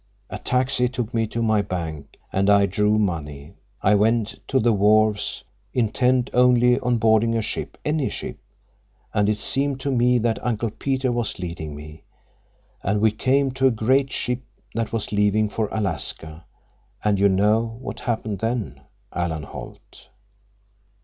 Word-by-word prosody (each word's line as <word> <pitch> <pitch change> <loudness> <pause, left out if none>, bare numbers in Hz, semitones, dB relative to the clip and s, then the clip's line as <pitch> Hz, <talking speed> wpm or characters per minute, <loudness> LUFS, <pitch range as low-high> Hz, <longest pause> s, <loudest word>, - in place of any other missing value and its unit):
A - - -5
taxi 125 -1 +1
took 125 -2 -4
me 115 -1 +1
to 115 +2 -2
my 110 -2 +3
bank, 85 -7 -5 0.2
and 95 +1 +2
I 100 -1 +6
drew 105 +2 +1
money. 75 -8 -3 0.3
I 100 - +4
went 110 +1 +1
to 135 - +2
the 115 -1 +3
wharves, 105 +1 +2 0.3
intent 125 +2 +1
only 125 0 +4
on 125 0 +1
boarding 115 0 +3
a - - +1
ship, 105 - -4
any 150 -3 0
ship, - - -6 0.7
and 105 0 +2
it 105 - +1
seemed 135 +4 0
to 140 - -1
me 125 0 +3
that 115 -1 -1
Uncle 115 -2 -1
Peter 130 +1 -1
was 120 -2 -2
leading 85 -4 -6
me; 75 +1 -11 0.8
and 105 +2 0
we 110 +1 +4
came 135 +5 +1
to 130 +1 +2
a - - +5
great 130 +4 +1
ship 125 0 -2 0.3
that 115 -1 -2
was 115 -2 -3
leaving 105 +1 +2
for 110 0 -1
Alaska—and 90 +2 -4
you 100 0 +5
know—what 110 +5 0
happened 110 -4 -2
then—Alan 85 - -4
Holt." - - -11
110 Hz, 150 wpm, -23 LUFS, 100-125 Hz, 0.8 s, I